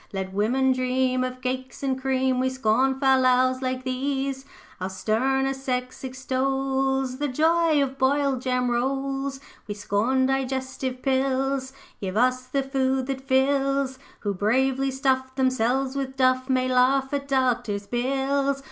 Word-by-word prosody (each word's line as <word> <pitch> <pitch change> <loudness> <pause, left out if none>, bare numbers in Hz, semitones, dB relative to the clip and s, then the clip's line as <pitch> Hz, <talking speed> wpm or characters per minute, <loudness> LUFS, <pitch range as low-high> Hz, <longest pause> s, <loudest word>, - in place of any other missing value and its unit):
Let 190 -1 -4
women 250 +6 +2
dream 255 0 +1
Of 255 0 -5
cakes 255 +1 -4
and 265 -1 -1
cream, 260 -1 +1
We 260 0 +1
scorn 260 +2 +1
fal 265 -1 +4
lals 255 0 +3
like 255 0 -2
these; 270 +1 -2 0.3
Our 185 +1 -3
sterner 265 +7 0
sex 255 -1 -4
extols 265 0 -1
The 295 - 0
joy 315 +2 +3
of 270 0 -5
boiled 275 -1 +2
jam 250 -1 0
rolls. 270 +2 -1 0.3
'We 205 - -4
scorn 215 +6 +1
digestive 260 -1 -2
pills; 265 0 0 0.3
Give 190 0 -4
us 255 +1 +2
the 275 +1 -1
food 265 -1 0
that 265 0 -4
fills; 270 0 +1 0.2
Who 205 -2 -1
bravely 265 +7 +1
stuff 260 -1 0
Themselves 260 +1 +1
with 265 -1 -4
Duff, 255 0 +2
May 255 -1 +2
laugh 260 +2 +2
at 280 0 -2
Doctor's 245 -6 0
bills. 275 +3 0
260 Hz, 140 wpm, -25 LUFS, 255-270 Hz, 0.3 s, fal